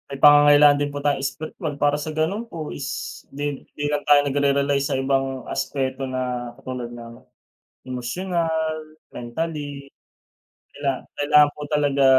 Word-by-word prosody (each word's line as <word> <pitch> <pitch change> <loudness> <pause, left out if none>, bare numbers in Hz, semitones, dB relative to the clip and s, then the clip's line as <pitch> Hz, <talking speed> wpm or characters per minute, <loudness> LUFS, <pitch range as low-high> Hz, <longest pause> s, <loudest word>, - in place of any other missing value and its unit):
May 140 - -5
pangangailangan 145 0 +7
din 145 - 0
po - - -4
tayong 145 -2 +1
espiritwal, 155 +2 -4
para 145 0 +3
sa 155 - -4
gano'n 195 +8 0
po 155 -2 -5
is - - -5 0.5
di 145 - -2 0.3
hindi 145 - -6
lang 145 0 -1
tayo 145 -1 +7
nagre-rely 140 0 +2
sa 140 - -1
ibang 135 -1 -1
aspeto 130 -1 -2
na 125 -1 -3
katulad 125 -3 -6
ng 115 -1 -9 0.8
emosyonal, 160 +4 -1 0.4
mentally. 145 +2 -5 0.8
Kaila 140 -1 -1 0.3
kailangan 145 0 +6
po 150 - -10
talaga 145 -2 +2
145 Hz, 140 wpm, -23 LUFS, 135-150 Hz, 0.8 s, pangangailangan